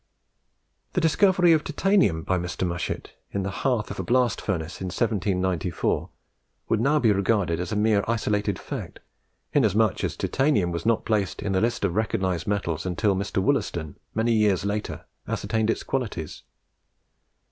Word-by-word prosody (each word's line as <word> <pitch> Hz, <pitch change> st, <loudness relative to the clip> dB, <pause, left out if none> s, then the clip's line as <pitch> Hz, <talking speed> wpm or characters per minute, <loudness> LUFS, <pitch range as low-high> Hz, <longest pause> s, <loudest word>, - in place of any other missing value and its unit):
The 180 Hz, -, +1 dB
discovery 175 Hz, +1 st, +4 dB
of 155 Hz, -, +2 dB
Titanium 190 Hz, -, +2 dB
by 95 Hz, +1 st, 0 dB
Mr. 90 Hz, +1 st, -3 dB
Mushet 85 Hz, +1 st, -4 dB, 0.2 s
in 100 Hz, -, -2 dB
the 95 Hz, -, -2 dB
hearth 120 Hz, -2 st, -1 dB
of -, -, -6 dB
a -, -, -1 dB
blast 125 Hz, -2 st, +2 dB
furnace 90 Hz, -3 st, -3 dB
in -, -, -3 dB
1794 95 Hz, -4 st, 0 dB, 0.6 s
would 110 Hz, -, +2 dB
now 140 Hz, +5 st, +3 dB
be 115 Hz, -7 st, +4 dB
regarded 100 Hz, -4 st, +1 dB
as 90 Hz, -, -3 dB
a -, -, -1 dB
mere 105 Hz, -1 st, +3 dB
isolated 105 Hz, -2 st, 0 dB
fact, -, -, -7 dB, 0.5 s
inasmuch 110 Hz, -5 st, +2 dB
as -, -, -2 dB
Titanium 120 Hz, -11 st, +1 dB
was 85 Hz, +6 st, -3 dB
not 115 Hz, -1 st, +2 dB
placed 105 Hz, -4 st, 0 dB
in 100 Hz, -, -1 dB
the 95 Hz, -, +2 dB
list 120 Hz, 0 st, 0 dB
of 90 Hz, -, 0 dB
recognised 95 Hz, -5 st, -1 dB
metals 85 Hz, -6 st, -1 dB
until 95 Hz, +3 st, +1 dB
Dr. 95 Hz, 0 st, -1 dB
Wollaston, 85 Hz, -, -1 dB, 0.2 s
many 115 Hz, +2 st, +2 dB
years 105 Hz, -4 st, +2 dB
later, 105 Hz, +1 st, -3 dB, 0.2 s
ascertained 110 Hz, -1 st, -1 dB
its -, -, 0 dB
qualities. 105 Hz, -, -3 dB
105 Hz, 160 wpm, -25 LUFS, 90-115 Hz, 0.6 s, discovery